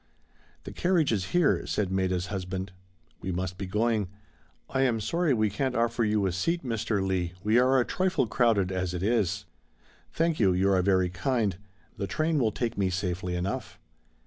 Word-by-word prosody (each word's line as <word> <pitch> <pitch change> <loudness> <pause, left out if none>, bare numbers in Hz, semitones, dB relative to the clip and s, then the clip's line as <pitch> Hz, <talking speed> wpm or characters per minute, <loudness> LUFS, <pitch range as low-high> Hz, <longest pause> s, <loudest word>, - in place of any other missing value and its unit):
"The - - -7
carriage 175 -6 +2
is 100 -5 0
here," 175 - +2
said 100 -3 -1
Maida's 95 -2 0
husband, 95 -1 -4 0.5
"we 95 - -3
must 90 +1 -3
be 95 - -4
going; 105 +1 +1 0.6
I 130 - -1
am 125 -4 +2
sorry 165 +9 0
we 110 -2 +1
can't 130 +5 -1
offer 115 0 +1
you 105 -2 +1
a 95 - +1
seat, 165 - -1
Mr. 110 -5 -1
Leigh, 90 -2 -1
we 110 +3 +4
are 130 +1 +4
a 120 - +2
trifle 185 -6 +1
crowded 110 -5 +2
as 90 -1 -2
it 90 - -3
is." 100 -3 +1 0.7
"Thank 165 -1 0
you, 95 -5 +4
you 95 +2 +2
are 95 -1 +3
very 95 -1 +2
kind. 110 0 0 0.4
The 100 - -3
train 155 -1 0
will 115 -4 +2
take 115 0 -3
me 95 -2 +2
safely 90 -1 -2
enough." 90 +3 -3
105 Hz, 180 wpm, -28 LUFS, 95-120 Hz, 0.7 s, we